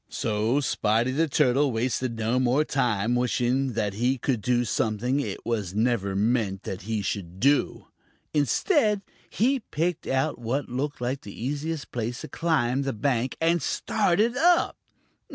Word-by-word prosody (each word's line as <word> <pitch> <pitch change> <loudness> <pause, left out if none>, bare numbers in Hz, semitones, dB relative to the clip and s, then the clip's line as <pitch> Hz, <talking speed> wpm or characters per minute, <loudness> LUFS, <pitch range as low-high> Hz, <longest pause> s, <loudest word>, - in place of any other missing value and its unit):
So 110 +4 0
Spotty 115 -1 +1
the 160 +5 +1
Turtle 140 0 +3
wasted 120 +1 -1
no 115 +3 +1
more 130 +4 +2
time 120 -5 0
wishing 125 +2 +1
that 105 -3 -1
he 125 +6 +1
could 120 -2 -1
do 120 +2 +1
something 115 +5 0
it 145 - -4
was 105 -5 -2
never 110 -4 +1
meant 105 -2 0
that 95 +1 -5
he 110 -2 -1
should 95 -2 -4
do. 140 +5 +2 0.5
Instead, 210 - +2 0.3
he 260 +5 +1
picked 175 -6 -2
out 130 -1 0
what 120 +5 -2
looked 135 +3 -3
like 130 +3 -2
the 100 - -10
easiest 145 +4 -3
place 120 0 -3
to - - -6
climb 135 -6 +1
the 135 -1 -2
bank 125 +2 -1
and 165 +1 +2
started 210 - +1
up. 345 +5 +3
125 Hz, 150 wpm, -26 LUFS, 115-145 Hz, 0.5 s, Turtle